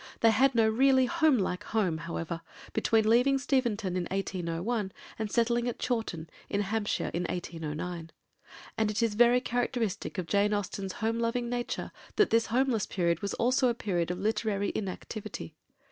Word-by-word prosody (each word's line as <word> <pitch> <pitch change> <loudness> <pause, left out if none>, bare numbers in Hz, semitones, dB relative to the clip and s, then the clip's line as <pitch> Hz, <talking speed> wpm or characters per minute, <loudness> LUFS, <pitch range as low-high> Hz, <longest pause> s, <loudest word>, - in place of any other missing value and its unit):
They 225 - +6
had 260 +4 +3
no 225 -1 +5
really 260 +3 +4
homelike 265 - +2
home, 185 -8 0
however, 165 0 -4 0.3
between 220 0 +2
leaving 250 +5 +4
Steventon 235 -8 0
in 180 -1 -1
1801 190 +3 -2 0.3
and 215 -2 -2
settling 235 0 +2
at 245 - -2
Chawton, 220 -10 -2 0.2
in 200 - 0
Hampshire, 210 +1 -1
in 175 +1 -1
1809; 165 0 -4 0.7
and 220 -1 +2
it 215 +2 0
is 225 -2 +1
very 240 +3 +5
characteristic 245 -5 -2
of 185 - -2
Jane 205 +4 +2
Austen's 195 -1 -3
home 230 +1 +1
loving 235 +1 0
nature 245 0 -3 0.2
that 420 - +3
this 230 0 +3
homeless 245 -2 +1
period 170 -3 0
was 200 - -2
also 255 +2 +3
a 240 - +1
period 175 -7 -1
of 180 - -2
literary 205 0 0
inactivity. 200 -2 -5
215 Hz, 160 wpm, -29 LUFS, 185-240 Hz, 0.7 s, They